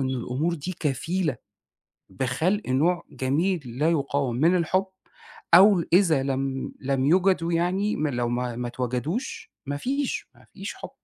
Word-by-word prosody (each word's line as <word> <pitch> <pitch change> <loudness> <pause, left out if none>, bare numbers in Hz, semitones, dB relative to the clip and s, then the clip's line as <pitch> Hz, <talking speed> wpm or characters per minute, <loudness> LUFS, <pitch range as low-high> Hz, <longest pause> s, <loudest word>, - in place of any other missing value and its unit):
إنه 130 -1 -1
الأمور 140 +8 -1
دي 170 +4 -5
كفيلة 155 +1 -1 0.7
بخلق 135 - 0
نوع 165 +7 +2
جميل 160 +7 0
لا 130 +7 0
يقاوم 140 -5 0
من 165 +8 +3
الحُب، 185 +3 +1 0.7
أو 190 0 +7
إذا 170 -7 +4
لم 135 0 -2
لم 135 0 0
يُوجدوا 175 +1 +3
يعني 185 +5 +1
م 155 - 0
لو 120 -4 -1
ما 120 0 -2
ما 120 +1 -3
اتوجدوش، 125 - -3
ما 145 +1 -3
فيش، 275 - -2
ما - - -20
فيش - - -6
حُب، - - -8
150 Hz, 145 wpm, -25 LUFS, 130-180 Hz, 0.7 s, أو